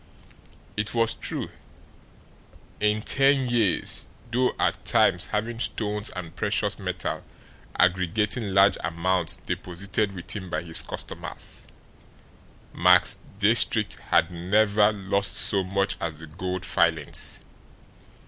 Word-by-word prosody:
It 105 +2 -2
was 115 -1 +2
true. - - -4 1.3
In 105 0 +1
ten 135 0 +3
years, 110 -8 +1 0.2
though 125 +1 +1
at - - 0
times - - +3
having 115 +2 -3
stones 105 -2 -2
and 85 -3 -7
precious - - 0
metal - - -4 0.6
aggregating 95 +5 +1
large 95 +1 +4
amounts 85 0 +2
deposited 100 +3 -3
with 90 - -3
him 95 -3 -6
by - - -3
his 80 -1 +3
customers, - - -5 1.1
Max 90 +1 +4 0.2
Diestricht 110 0 +4
had 85 - +3
never 105 +4 +2
lost 100 -1 -1
so 100 -2 +2
much 95 +1 -1
as 80 -2 -3
the 80 - -7
gold 90 +4 -5
filings. - - 0
100 Hz, 110 wpm, -25 LUFS, 90-110 Hz, 1.3 s, large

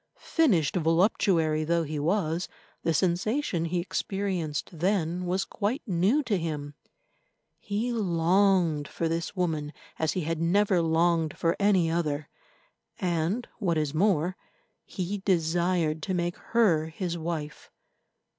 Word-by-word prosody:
Finished 195 - +2
voluptuary 165 -2 +2
though 170 +1 +1
he 155 -1 -4
was, 170 +1 0 0.3
the 165 - +1
sensation 180 - 0
he 175 +1 -1
experienced 185 -4 -2
then 180 -1 0
was 190 +2 0
quite 225 +10 -2
new 200 - +2
to 215 -7 0
him. 150 -3 -4 0.9
He 215 +4 -2
longed 175 -5 +2
for 165 - -2
this 165 +4 -3
woman 160 -5 -1 0.3
as 160 -1 +1
he 185 - -1
had 165 0 -2
never 185 +1 +3
longed 165 -1 +1
for 165 0 +1
any 190 -5 +3
other, 155 -3 -1 0.7
and, 180 +5 -1
what 175 -7 +1
is 150 -2 -1
more, 180 0 +2 0.5
he 190 +2 -4
desired 170 -3 +1
to 190 - -2
make 175 0 -1
her 180 -10 +2
his 170 +1 -4
wife. 160 -3 -5
170 Hz, 125 wpm, -27 LUFS, 160-195 Hz, 0.9 s, never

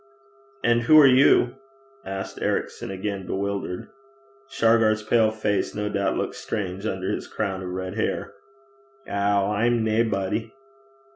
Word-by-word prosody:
'And 120 0 +3
who 155 +6 +6
are 150 - +8
you?' 130 -1 +5 0.5
asked 95 -2 -6
Ericson - - -2
again, 95 0 -4
bewildered. 100 -2 -3 0.6
Shargar's 110 -1 +3
pale 110 0 +3
face 110 -2 -1
no 105 0 -2
doubt 100 -1 -1
looked - - -2
strange 100 0 -4
under 95 -2 -2
his - - -4
crown 95 -1 -3
of 90 - -5
red 95 +1 -4
hair. 110 - -2 0.7
'Ow! 100 0 +1
I'm 115 +2 +1
naebody.' 110 0 -1
105 Hz, 130 wpm, -24 LUFS, 95-115 Hz, 0.7 s, are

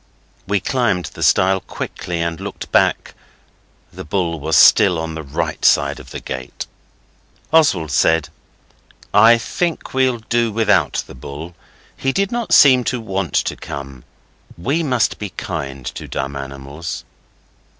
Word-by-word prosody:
We 100 0 +1
climbed 105 -5 0
the - - -10
stile 95 +1 +3
quickly 85 -2 -5
and 85 -1 -3
looked - - -7
back; - - +2 0.8
the - - -8
bull 85 -1 -2
was 80 +2 0
still 90 +3 +6
on 80 0 -4
the 80 - -5
right 70 -3 -4
side - - +3
of - - -13
the - - -6
gate. 65 -1 -6 0.9
Oswald 140 - +3
said, 80 +2 +2 0.8
'I 115 +3 +7
think 170 +8 -3
we'll 130 -2 +2
do 115 0 0
without 105 -1 +2
the - - -12
bull. 70 +7 -8 0.4
He 135 - -1
did 195 +5 0
not 240 -1 -3
seem 130 -3 +7
to 125 - -1
want 95 -7 -3
to - - -2
come. 70 -3 -8 0.5
We 140 - 0
must 125 -7 0
be 105 - -4
kind 70 -9 -6
to - - -8
dumb 70 +1 -4
animals. 70 +3 -7
90 Hz, 145 wpm, -19 LUFS, 75-120 Hz, 0.9 s, I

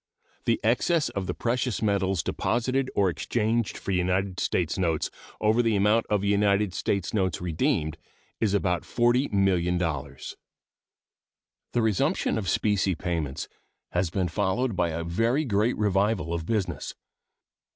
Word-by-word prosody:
The 115 - +2
excess 145 +8 +2
of 95 -2 -4
the - - -2
precious 120 -1 -1
metals 95 -5 +1
deposited 130 +3 0
or 100 - +3
exchanged 110 +5 -1
for - - -4
United 95 +1 0
States 85 -3 0
notes 85 -4 0 0.3
over 110 +3 +3
the 115 -2 +1
amount 105 +3 +3
of 105 -2 +1
United 100 -1 +2
States 100 -1 -1
notes 95 -5 0
redeemed 85 - 0 0.4
is 105 -3 +1
about 90 -4 +1
$40,000,000. 90 - 0 1.4
The 120 - +2
resumption 110 - +1
of 95 -4 -3
specie 100 -2 +1
payments 80 -5 -3 0.4
has 90 0 0
been 90 +1 0
followed 105 +6 0
by 85 -1 +1
a 85 +1 -3
very 115 - +1
great 110 0 +1
revival 100 -4 +1
of 85 -1 -3
business. 105 -5 -2
100 Hz, 130 wpm, -26 LUFS, 90-115 Hz, 1.4 s, or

